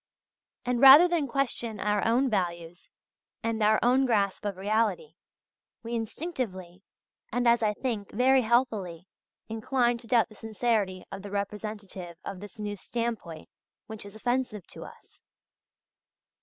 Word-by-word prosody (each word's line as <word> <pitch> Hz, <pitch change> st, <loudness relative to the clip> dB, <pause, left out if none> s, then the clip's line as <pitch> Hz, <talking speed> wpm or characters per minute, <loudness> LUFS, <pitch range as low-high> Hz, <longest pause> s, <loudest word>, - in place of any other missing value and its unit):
And, 245 Hz, 0 st, 0 dB
rather 280 Hz, +6 st, +10 dB
than 340 Hz, -5 st, 0 dB
question 240 Hz, -4 st, -2 dB
our 210 Hz, +1 st, 0 dB
own 240 Hz, +4 st, +2 dB
values 175 Hz, -5 st, -3 dB, 0.5 s
and 230 Hz, -1 st, -1 dB
our 215 Hz, +1 st, +4 dB
own 260 Hz, +2 st, +4 dB
grasp 205 Hz, -4 st, 0 dB
of 200 Hz, -2 st, -3 dB
reality, 220 Hz, -, 0 dB, 0.7 s
we 230 Hz, +1 st, -6 dB
instinctively, 225 Hz, -, -4 dB, 0.5 s
and, 245 Hz, +1 st, 0 dB
as 235 Hz, 0 st, +4 dB
I 210 Hz, -1 st, +1 dB
think, 220 Hz, -6 st, -3 dB
very 260 Hz, +3 st, +4 dB
healthily, 220 Hz, -8 st, 0 dB, 0.4 s
incline 240 Hz, +2 st, 0 dB
to 235 Hz, -, -14 dB
doubt 235 Hz, -1 st, +3 dB
the -, -, -15 dB
sincerity 215 Hz, -4 st, -1 dB
of 195 Hz, -, -6 dB
the 205 Hz, -, -8 dB
representative 200 Hz, -3 st, -5 dB
of 195 Hz, -2 st, -6 dB
this 205 Hz, +4 st, -11 dB
new 205 Hz, -1 st, -4 dB
standpoint 225 Hz, -9 st, -4 dB, 0.4 s
which 220 Hz, -1 st, -8 dB
is 200 Hz, +1 st, -12 dB
offensive 245 Hz, -3 st, -2 dB
to -, -, -9 dB
us. -, -, -16 dB
220 Hz, 140 wpm, -28 LUFS, 200-245 Hz, 0.7 s, rather